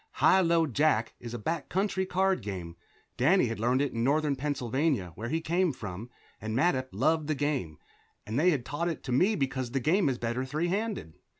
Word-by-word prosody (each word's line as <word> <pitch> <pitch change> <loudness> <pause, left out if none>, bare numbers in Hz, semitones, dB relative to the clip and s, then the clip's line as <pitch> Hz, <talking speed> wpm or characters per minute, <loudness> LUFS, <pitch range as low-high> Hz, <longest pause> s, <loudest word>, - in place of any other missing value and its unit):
High 190 - +5
low 170 -2 +3
jack 140 -4 +1
is 120 0 -7
a - - -2
back 150 +7 -3
country 190 0 0
card 190 +1 +1
game; 90 -5 -6 0.4
Danny 165 +9 +4
had 115 -2 -3
learned 125 +4 +2
it 145 - -2
in 115 - -1
northern 145 +2 +2
Pennsylvania, 130 - -1
where 115 +6 -6
he 160 +2 -1
came 175 +2 +1
from, 105 -2 -7 0.3
and 110 +1 -3
Mattup 130 -4 +2
loved 150 +8 +1
the 155 - 0
game, 135 - -2 0.5
and 110 +5 -2
they 175 +4 +5
had 140 -8 0
taught 170 +4 -2
it 165 - -5
to 130 - -5
me 185 - +3
because 135 -4 -2
the 135 +3 -1
game 160 +4 +2
is 130 - -1
better 120 +2 -2
three 155 +6 -2
handed. 200 - -2
140 Hz, 205 wpm, -29 LUFS, 120-165 Hz, 0.5 s, High